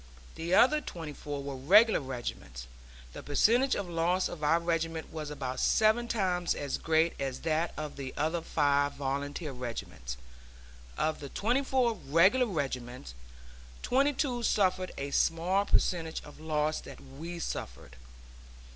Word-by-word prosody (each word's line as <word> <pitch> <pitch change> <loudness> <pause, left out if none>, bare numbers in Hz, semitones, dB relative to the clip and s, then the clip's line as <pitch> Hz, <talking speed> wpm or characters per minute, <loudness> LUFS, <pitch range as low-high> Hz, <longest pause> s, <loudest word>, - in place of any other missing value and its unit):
The 170 +3 0
other 300 +8 +5
twenty 160 - -7
four 145 -1 -6
were 140 -1 -5
regular 205 - +5
regiments. 120 - -6 0.5
The - - -7
percentage 240 - +3
of 200 - -3
loss 175 +2 +1
of 155 -3 -8
our 160 +3 +4
regiment 165 -1 -2
was 155 -2 -5
about 130 -3 -4
seven 220 +2 +3
times 180 -6 0
as 140 -2 -3
great 160 +1 +2
as 135 -2 -3
that 165 +1 0
of 150 -2 -5
the 135 -2 -5
other 160 +3 0
five 145 -3 +1
volunteer 140 +2 -3
regiments. 115 - -6 0.8
Of 155 - 0
the 140 - -7
twenty 245 - 0
four 255 -3 +2
regular 190 - +3
regiments, 125 - -4 0.7
twenty 275 +3 +3
two 255 -3 -1
suffered 185 -4 +1
a 140 0 -4
smaller 175 +7 +2
percentage 165 -5 0
of 150 - -13
loss 155 0 -1
than 135 +1 -12
we 170 +2 -6
suffered. 65 - -6
160 Hz, 145 wpm, -30 LUFS, 140-190 Hz, 0.8 s, other